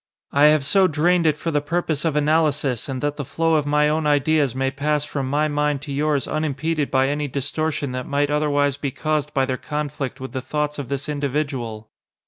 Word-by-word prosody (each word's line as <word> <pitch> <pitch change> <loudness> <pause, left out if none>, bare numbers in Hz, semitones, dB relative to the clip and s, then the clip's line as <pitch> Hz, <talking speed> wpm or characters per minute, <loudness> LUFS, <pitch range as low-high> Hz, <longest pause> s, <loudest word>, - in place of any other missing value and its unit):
"I 145 +1 +5
have 150 -2 +5
so 190 +5 +4
drained 170 +2 +2
it 150 -1 +2
for 165 +3 -3
the 145 -1 +1
purpose 160 -1 -1
of 160 -3 0
analysis 150 -4 +1
and 130 0 -4
that 145 0 -1
the 145 - -3
flow 165 +5 0
of 150 -2 +2
my 150 +1 +3
own 155 0 0
ideas 145 -2 +2
may 135 0 0
pass 150 +1 0
from 135 -3 -3
my 150 +2 +2
mind 145 -1 0
to 140 - -5
yours 145 0 0
unimpeded 155 0 -1
by 130 0 +2
any 145 +1 -1
distortion 145 +1 -2
that 125 0 -4
might 145 +1 0
otherwise 145 -2 +1
be 145 -1 -2
caused 150 +1 -2
by 135 -3 +1
their 130 -1 -2
conflict 150 -2 -4
with 130 0 -6
the 130 - -3
thoughts 150 +2 -2
of 135 -4 -5
this 140 0 -3
individual. 140 -7 -3
145 Hz, 210 wpm, -22 LUFS, 140-150 Hz, -, I